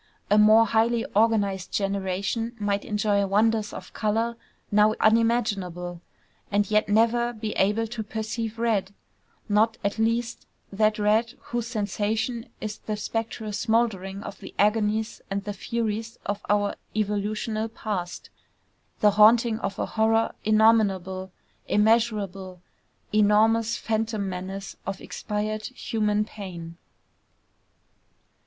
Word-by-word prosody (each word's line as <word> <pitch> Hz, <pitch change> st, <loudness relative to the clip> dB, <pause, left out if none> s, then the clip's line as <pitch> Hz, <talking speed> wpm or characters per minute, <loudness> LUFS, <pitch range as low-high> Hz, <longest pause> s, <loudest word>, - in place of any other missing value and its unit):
A 210 Hz, -, +6 dB
more 215 Hz, +2 st, +7 dB
highly 230 Hz, +1 st, +2 dB
organized 200 Hz, -4 st, +2 dB
generation 200 Hz, +4 st, -2 dB
might 205 Hz, -1 st, 0 dB
enjoy 210 Hz, -1 st, +1 dB
wonders 215 Hz, +2 st, +2 dB
of -, -, -9 dB
color 225 Hz, +2 st, 0 dB, 0.4 s
now 210 Hz, +1 st, +4 dB
unimaginable, 205 Hz, -7 st, +1 dB, 0.5 s
and 205 Hz, 0 st, +1 dB
yet 215 Hz, 0 st, +2 dB
never 235 Hz, +3 st, +3 dB
be 215 Hz, -1 st, -4 dB
able 210 Hz, +4 st, +1 dB
to 225 Hz, 0 st, -5 dB
perceive 220 Hz, +1 st, -4 dB
red, 210 Hz, -4 st, 0 dB, 0.5 s
not, 220 Hz, +2 st, +2 dB
at 200 Hz, +2 st, -1 dB
least, 230 Hz, +1 st, -1 dB, 0.3 s
that 215 Hz, +1 st, +2 dB
red 220 Hz, +3 st, +2 dB
whose 240 Hz, -1 st, -3 dB
sensation 220 Hz, +2 st, -2 dB
is 215 Hz, -1 st, -5 dB
the 215 Hz, -1 st, -4 dB
spectral 220 Hz, 0 st, -4 dB
smouldering 205 Hz, -4 st, 0 dB
of 195 Hz, -, -8 dB
the 190 Hz, -, -11 dB
agonies 215 Hz, +1 st, +1 dB
and 195 Hz, 0 st, -2 dB
the 205 Hz, 0 st, -4 dB
furies 225 Hz, +1 st, -3 dB
of 205 Hz, 0 st, -2 dB
our 205 Hz, 0 st, +2 dB, 0.2 s
evolutional 215 Hz, +1 st, -1 dB
past, 200 Hz, -5 st, -5 dB, 0.7 s
the 210 Hz, -, +6 dB
haunting 220 Hz, +2 st, +5 dB
of 195 Hz, 0 st, -3 dB
a -, -, -1 dB
horror 225 Hz, 0 st, +1 dB
innominable, 200 Hz, -4 st, +3 dB, 0.4 s
immeasurable, 210 Hz, -4 st, +1 dB, 0.5 s
enormous 215 Hz, +2 st, +3 dB
phantom 220 Hz, -2 st, -1 dB
menace 190 Hz, +1 st, -6 dB
of 195 Hz, 0 st, -4 dB
expired 215 Hz, 0 st, -4 dB
human 210 Hz, -4 st, -1 dB
pain. 170 Hz, -6 st, -8 dB
215 Hz, 115 wpm, -25 LUFS, 200-225 Hz, 0.7 s, more